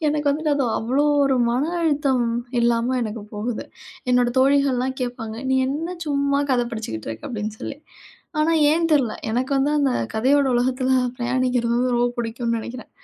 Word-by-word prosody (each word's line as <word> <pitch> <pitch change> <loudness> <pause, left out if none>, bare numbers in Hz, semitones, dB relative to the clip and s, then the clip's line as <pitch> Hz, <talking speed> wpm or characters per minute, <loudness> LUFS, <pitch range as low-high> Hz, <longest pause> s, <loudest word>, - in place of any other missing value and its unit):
எனக்கு 295 0 0
வந்துட்டு 305 +2 -1
அது 280 -2 +1
அவ்வளோ 255 +6 +1 0.2
ஒரு 275 -1 +2 0.2
மன 250 +4 +1 0.2
அழுத்தம் 285 -6 +1 0.4
இல்லாம 235 +1 +2
எனக்குப் 215 -1 -6
போகுது. 220 +2 -3 0.5
என்னோட 245 -1 +4
தோழிகள் 275 +1 +4
எல்லா 250 +1 0
கேப்பாங்க, 235 -3 -4
"நீ - - +3
என்ன 325 +6 -3
சும்மா 280 -1 +1
கதை 245 -2 +2
படிச்சிகிட்டு 220 - -5
இருக்க?" 110 0 -8
அப்படின்னு 215 -2 -4
சொல்லி. 275 - -5 0.6
ஆனா, 320 +2 +3 0.2
ஏன் 330 +1 +2
தெரியல. 255 -7 +2 0.2
எனக்கு 250 +4 -1
வந்து 275 +2 +2
அந்தக் 260 - 0
கதையோட 270 +5 +3
உலகத்துல 255 +1 +1 0.3
பிரயாணிக்கிறது 245 -1 0
வந்து 250 0 +1
ரொம்ப 240 0 +2
பிடிக்கும்னு 230 0 -2
நெனைக்கிறேன். 240 +1 -8
250 Hz, 160 wpm, -22 LUFS, 235-280 Hz, 0.6 s, என்னோட